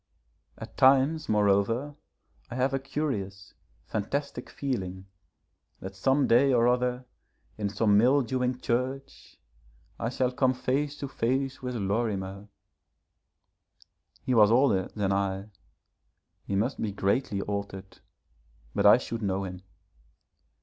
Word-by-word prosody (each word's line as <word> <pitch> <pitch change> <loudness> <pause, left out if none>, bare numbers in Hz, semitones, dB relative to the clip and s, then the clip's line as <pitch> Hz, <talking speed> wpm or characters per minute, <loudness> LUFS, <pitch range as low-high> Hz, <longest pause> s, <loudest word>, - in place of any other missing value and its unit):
At - - -10
times, 140 +4 +4
moreover, 105 +7 +1 0.5
I 120 - -6
have 130 +1 0
a 135 - +1
curious, 120 -9 -4 0.3
fantastic 125 +4 -4
feeling, 95 -9 -4 0.7
that 95 +1 -8
some 135 +8 +2
day 130 +4 +4
or 120 -1 +4
other, 125 0 0 0.5
in 105 -1 -2
some 105 0 +3
mildewing 125 0 +2
church, 130 +3 -3 0.6
I 115 - -1
shall 125 0 0
come 130 0 +1
face 140 +3 -1
to 140 - -3
face 130 +2 -2
with 125 -1 -4
Lorimer. 100 -2 -2 1.8
He 130 - 0
was 105 -3 +6
older 115 -6 +3
than 100 -2 0
I, 100 +1 -2 0.9
he 100 - -2
must 115 +7 -1
be 110 - -1
greatly 100 +1 0
altered, 100 -1 -6 0.7
but - - +3
I - - +8
should 115 -1 -5
know 100 -1 -1
him. 90 -1 -7
120 Hz, 120 wpm, -28 LUFS, 100-130 Hz, 1.8 s, I